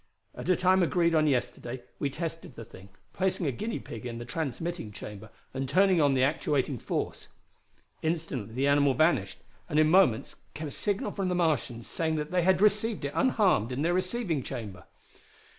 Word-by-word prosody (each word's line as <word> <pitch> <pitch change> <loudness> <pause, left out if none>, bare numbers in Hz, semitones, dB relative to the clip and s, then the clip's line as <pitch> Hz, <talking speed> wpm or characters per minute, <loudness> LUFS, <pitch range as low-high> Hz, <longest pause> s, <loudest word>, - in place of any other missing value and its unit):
At - - -6
a 185 - +5
time 185 +2 +3
agreed 170 -1 +2
on 155 -1 +4
yesterday 125 -2 -2 0.2
we 140 - 0
tested 165 -2 -6
the 115 - -8
thing, 100 -4 -14 0.2
placing 190 -2 0
a 140 - +1
guinea 215 - -3
pig 115 -2 -8
in 120 -1 -5
the 120 - -6
transmitting 160 -1 -4
chamber 105 +1 -9 0.2
and 135 0 -3
turning 185 -1 +4
on 140 -2 +3
the 130 - +3
actuating 140 -2 0
force. - - -3 0.7
Instantly 155 -9 -3
the 135 +2 +1
animal 140 -1 +4
vanished, 160 +6 +1 0.3
and 150 - 0
in 155 0 +5
moments 180 -12 +3 0.2
came 155 -1 -4
a - - -10
signal 205 +7 -1
from 195 -2 -2
the 180 - 0
Martians 150 -9 0
saying 160 -1 -1
that 150 +1 -3
they 180 -1 +2
had 185 +1 +3
received 210 -3 +2
it 140 - -3
unharmed 195 - +2
in 130 +4 -2
their 170 +2 +2
receiving 185 - 0
chamber. 100 -7 -7
155 Hz, 185 wpm, -29 LUFS, 130-180 Hz, 0.7 s, a